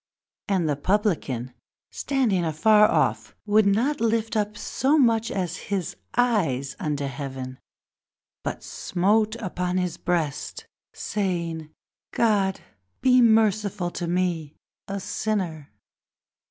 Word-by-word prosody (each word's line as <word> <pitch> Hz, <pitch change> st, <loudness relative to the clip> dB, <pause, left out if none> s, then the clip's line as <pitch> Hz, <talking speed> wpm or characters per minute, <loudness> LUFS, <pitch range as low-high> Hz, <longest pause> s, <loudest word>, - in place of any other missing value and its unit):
The 165 Hz, -8 st, 0 dB
Publican, 155 Hz, -, 0 dB, 0.4 s
Standing 240 Hz, -10 st, 0 dB
afar 210 Hz, +7 st, +4 dB
off, -, -, 0 dB
would 210 Hz, 0 st, +4 dB
not 230 Hz, +8 st, +1 dB
lift 225 Hz, -1 st, +1 dB, 0.2 s
so 270 Hz, +8 st, +1 dB
much 230 Hz, -4 st, +3 dB
Even 190 Hz, -, -1 dB
as 175 Hz, -1 st, -5 dB
his 190 Hz, -, -3 dB, 0.2 s
eyes 160 Hz, -, +1 dB
to 145 Hz, -2 st, -2 dB
heaven, 130 Hz, -1 st, -6 dB, 0.8 s
but -, -, -4 dB
smote 210 Hz, +4 st, +1 dB
his 180 Hz, -3 st, -2 dB
breast, 155 Hz, -5 st, -2 dB, 0.3 s
Saying: 170 Hz, -6 st, -3 dB, 0.4 s
God 200 Hz, -4 st, +2 dB, 0.4 s
be 255 Hz, -1 st, +5 dB
merciful 210 Hz, -5 st, +3 dB
to 175 Hz, -, -4 dB
me 170 Hz, -4 st, -1 dB, 0.3 s
a 200 Hz, 0 st, -3 dB
sinner! 185 Hz, -, -3 dB
190 Hz, 100 wpm, -25 LUFS, 160-215 Hz, 0.8 s, be